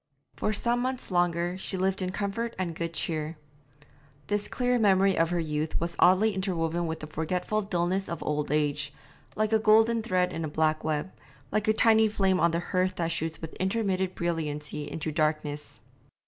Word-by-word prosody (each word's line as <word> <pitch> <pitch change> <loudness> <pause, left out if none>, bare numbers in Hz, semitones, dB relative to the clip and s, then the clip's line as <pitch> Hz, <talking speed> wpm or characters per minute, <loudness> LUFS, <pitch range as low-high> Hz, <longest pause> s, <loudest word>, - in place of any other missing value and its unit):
For - - -1
some 235 +3 +1
months 255 -3 -3
longer 175 0 +1
she 190 - 0
lived 190 +1 0
in 185 0 -1
comfort 210 +4 -3
and 180 -3 -2
good 165 0 -4
cheer. 155 0 -2 0.9
This 205 0 0
clear 245 -1 0
memory 195 -2 +4
of 165 0 +2
her 175 0 0
youth 155 -1 -2
was 170 0 -3
oddly 195 +4 +5
interwoven 175 -3 -1
with 160 0 -4
the - - -5
forgetful 180 +7 -1
dulness 190 -1 -1
of 170 - -4
old 150 0 -1
age, 150 -1 0 0.4
like 215 +1 0
a 220 - +5
golden 225 +1 +4
thread 185 -5 0
in 165 - -3
a - - -1
black 155 +1 +1
web, 155 +3 -1 0.4
like 215 0 0
a 215 - +5
tiny 220 0 +5
flame 195 -3 +1
on 170 - +4
the 165 0 0
hearth 185 +1 0
that 170 -1 -1
shoots 160 -1 -3
with 160 -1 -7
intermittent 190 -2 0
brilliancy 150 -3 -2
into 155 0 -3
darkness. 150 -1 -2
180 Hz, 180 wpm, -28 LUFS, 160-200 Hz, 0.9 s, oddly